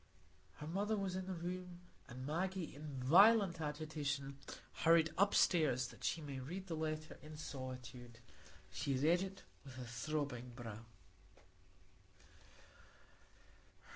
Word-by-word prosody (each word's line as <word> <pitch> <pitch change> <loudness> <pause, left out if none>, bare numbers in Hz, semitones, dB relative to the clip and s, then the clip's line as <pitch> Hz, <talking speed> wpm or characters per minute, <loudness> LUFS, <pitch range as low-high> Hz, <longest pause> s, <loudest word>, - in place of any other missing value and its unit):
Her 150 - -8
mother 200 +7 0
was 195 -2 -1
in 185 0 -3
the 190 - -2
room, 180 +1 -5 0.3
and 130 +2 -7
Maggie, 180 +3 -1
in 145 -2 -6
violent 190 - +7
agitation, 145 -2 -3 0.4
hurried 165 -1 +6
upstairs 155 -9 +4
that - - -14
she 165 - 0
might 140 -3 -5
read 180 +8 -5
the 175 - -4
letter 155 0 -3
in 155 0 -9
solitude. 125 -4 -7 0.5
She 140 - -1
read 160 +7 +4
it 195 0 -5 0.2
with 135 -2 -10
a 125 - -5
throbbing 125 0 -3
brow. 115 -2 -7
155 Hz, 120 wpm, -38 LUFS, 130-180 Hz, 0.5 s, violent